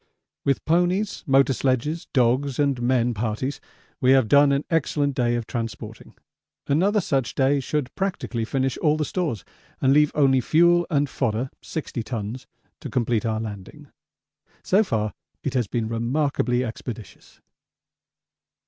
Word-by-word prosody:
With 140 -1 0
ponies, 180 +5 +1
motor 135 0 +4
sledges, 135 +6 -1
dogs, 130 +1 +2
and 140 -4 +1
men 120 -1 +2
parties 115 +6 -3 0.4
we 130 0 +5
have 130 -4 +4
done 140 +4 +5
an 140 +1 0
excellent 145 -3 +1
day 120 -2 +1
of 120 -1 -2
transporting 115 -3 -6 0.5
another 190 +9 +2
such 135 - -1
day 140 +1 +2
should 135 0 -3
practically 185 -11 -2
finish 130 +2 -1
all 155 -1 +2
the 155 - -1
stores 155 - -3 0.3
and 135 0 +3
leave 150 0 +4
only 135 -3 +4
fuel 175 +4 +4
and 145 -3 +1
fodder 130 -1 -2
(60 145 -6 -5
tons) 115 +1 -5 0.3
to - - -7
complete 120 -2 0
our 110 -1 -1
landing. 105 -4 -8 0.7
So 200 +4 +3
far 110 - -2 0.3
it 140 - -2
has 125 -5 0
been 115 +2 -2
remarkably 125 +2 0
expeditious. 115 -1 -9
130 Hz, 140 wpm, -24 LUFS, 120-150 Hz, 0.7 s, we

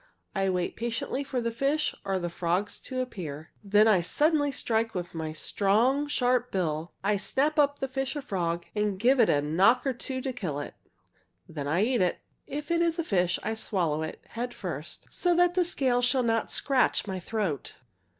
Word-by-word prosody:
I 195 -1 +1
wait 180 -1 -1
patiently 235 +4 -2
for 265 -3 -2
the 230 0 -1
fish 275 +6 0
or 195 -1 0
the 175 -1 -2
frogs 180 +4 -1
to 255 -1 -3
appear. 160 - -6
"Then 210 +2 +5
I 200 -5 +5
strike 295 - +2 0.3
suddenly 225 0 +1
with 175 -1 -4
my 160 -1 -3
strong, 225 - +1
sharp 250 -3 +1
bill. 165 -3 -1
I 205 +1 +2
snap 280 +10 0
up 285 0 +3
the 270 - -2
fish 270 +1 -3
or 290 - -4
frog 170 -7 -2
and 210 -2 0
give 255 +5 +4
it 230 - +5
a 145 0 +3
knock 190 - +3
or 270 - +1
two 260 +2 -5
to 260 0 -3
kill 175 - -3
it. 145 - -6 0.7
"Then 145 -3 -5
I 170 +7 +2
eat 245 -1 +2
it. 180 -1 +2 0.3
If 295 +3 -5
it 340 0 +3
is 335 -1 +1
a 335 - 0
fish 180 - +1
I 220 - -1
swallow 175 -8 0
it, 160 - -5
head 240 +1 -4
first, - - -5
so 355 -1 +1
that 355 0 +4
the 360 0 +3
scales 255 -8 +2
shall 250 +1 +3
not 225 -1 0
scratch 265 -6 +2
my 190 -2 -4
throat. 185 - -3
225 Hz, 200 wpm, -28 LUFS, 180-265 Hz, 0.7 s, Then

